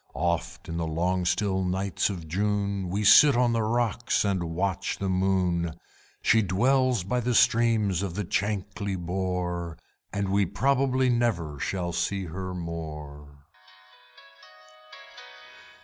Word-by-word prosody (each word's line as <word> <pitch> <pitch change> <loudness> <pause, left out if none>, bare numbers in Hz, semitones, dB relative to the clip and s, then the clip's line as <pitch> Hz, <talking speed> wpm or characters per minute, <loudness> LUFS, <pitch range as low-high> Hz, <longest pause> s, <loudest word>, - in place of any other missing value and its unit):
Oft, 85 +2 -2
in 85 -1 -4
the 85 -1 -2
long 90 +3 0
still 95 +1 0
nights 95 +1 -1
of 85 -5 -6
June, 100 +1 -1
We 100 +4 -1
sit 130 +6 +7
on 120 -1 +3
the 115 - +1
rocks 120 +1 0
and 95 -3 0
watch 95 +1 -1
the 95 - -2
moon, 90 -3 0 0.5
She 110 - +4
dwells 125 +4 +2
by 125 +7 -1
the 125 0 -1
streams 110 -7 +3
of 95 -4 -4
the 105 - -2
Chankly 100 +1 -2
Bore. 90 -2 -3 0.3
And 100 -1 -2
we 100 -1 +2
probably 130 +5 +1
never 90 -12 -1
shall 90 0 -2
see 95 +3 -1
her 90 +2 -5
more. 75 -4 -8
95 Hz, 130 wpm, -27 LUFS, 85-105 Hz, 0.5 s, sit